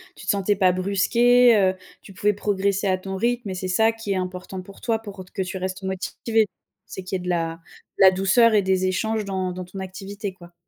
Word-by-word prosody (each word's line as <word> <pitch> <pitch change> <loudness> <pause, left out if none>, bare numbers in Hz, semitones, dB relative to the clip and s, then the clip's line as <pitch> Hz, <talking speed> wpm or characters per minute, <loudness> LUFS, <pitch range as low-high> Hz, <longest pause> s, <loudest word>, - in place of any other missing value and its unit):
tu - - -12
te - - -3
sentais 200 -1 +2
pas 185 -2 +4
brusquée, 235 +6 +4
heu, 190 -1 +3 0.3
tu 195 - -13
pouvais 205 +3 +1
progresser 200 0 0
à 185 -1 +1
ton 190 0 -5
rythme 235 +1 -1
et 185 - -4
c'est 185 0 -4
ça 220 +5 +3
qui 225 -3 -6
est - - +1
important 185 +1 -5
pour 195 +2 -14
toi 225 -2 0
pour, 205 -3 -10
heu, 185 - -7
t - - -23
que 195 - -2
tu 190 +1 -4
restes 185 +1 -4
motivée. 210 +4 0 0.4
C'est 190 - -8
qu'il 185 +1 -4
y - - -1
ait - - -9
de - - -3
la 165 -2 -1 0.4
de - - +4
la 190 - +9
douceur 195 +5 +4
et 210 - +5
des 190 0 +1
échanges 215 +3 -1
dans 190 -2 -2
dans 180 0 -6
ton 190 +2 -9
activité 195 +1 -6
quoi? 175 -1 -16
190 Hz, 245 wpm, -23 LUFS, 185-210 Hz, 0.4 s, la